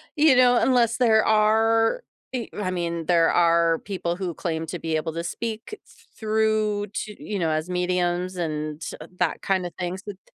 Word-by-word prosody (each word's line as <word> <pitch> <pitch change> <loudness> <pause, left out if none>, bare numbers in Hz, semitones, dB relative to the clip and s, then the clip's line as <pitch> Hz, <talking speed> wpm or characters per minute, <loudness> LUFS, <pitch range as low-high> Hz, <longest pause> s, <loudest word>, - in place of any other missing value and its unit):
you 300 -3 +5
know, 245 -1 +5
unless 235 -3 +3
there 220 -3 +4
are 225 - +3 0.3
i 240 -3 -3
I 185 -3 -1
mean, 170 -2 -3
there 170 -2 +4
are 170 -1 +3
people 180 -4 -3
who 180 -2 -4
claim 160 -1 -3
to 175 +1 -5
be 160 -1 -2
able 155 +1 -2
to 170 0 -4
speak 225 - -5
thr - - -23
through 215 -1 +1
to 210 -1 -5
you 205 -2 -3
know 165 - +1
as 155 +3 -2
mediums 180 0 -1
and 155 -2 -3
t - - -5 0.2
that 180 -3 0
kind 190 -2 0
of 175 - -6
things, 185 +2 -4
th 205 -1 -7
th 185 - -64
185 Hz, 190 wpm, -24 LUFS, 170-220 Hz, 0.3 s, you